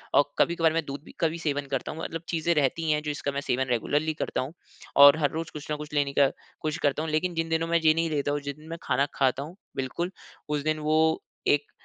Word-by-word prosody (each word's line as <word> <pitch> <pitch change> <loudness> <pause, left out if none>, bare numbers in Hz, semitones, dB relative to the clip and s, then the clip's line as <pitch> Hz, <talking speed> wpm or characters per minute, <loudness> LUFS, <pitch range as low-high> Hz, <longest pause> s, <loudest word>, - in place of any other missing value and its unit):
और 145 - +7 0.2
कभी-कभार 165 -2 +3
मैं 165 - +1
दूध 140 0 -6
भी - - -13
का 165 - +3
भी 160 +2 -4
सेवन 145 -3 -1
करता 135 - -2
हूँ। 160 - -8
मतलब 165 0 -4
चीज़े 170 0 +1
रहती 155 +2 +1
हैं 150 0 +2
जो 150 - -1
इसका 145 -1 -3
मैं 140 - -2
सेवन 130 -1 0
रेगुलरली 145 +6 +1
करता 155 - -2
हूँ। 135 +5 -5 0.4
और 140 +2 +9
हर 145 -3 +3
रोज़ 165 +1 -4
कुछ 150 0 -8
न - - +1
कुछ 150 0 -8
लेने 145 -1 +1
का 140 - +7 0.3
कोशिश 155 0 -1
करता 145 +2 +2
हूँ 160 - -3
लेकिन 175 +3 0
जिन 165 0 -1
दिनों 165 0 +1
में 170 - +3
ये 155 -1 +5
नहीं 165 0 0
लेता 145 -2 0
हूँ 145 - 0
जिस 140 -1 -5
दिन 155 +1 -15
मैं 165 - -5
खाना 140 - +2
खाता 135 0 +1
हूँ 165 +5 -10 0.2
बिल्कुल, 170 +7 -2 0.4
उस 150 -1 0
दिन 155 0 0
वो 155 +1 +2 0.3
एक 145 0 +2
150 Hz, 260 wpm, -27 LUFS, 145-160 Hz, 0.4 s, और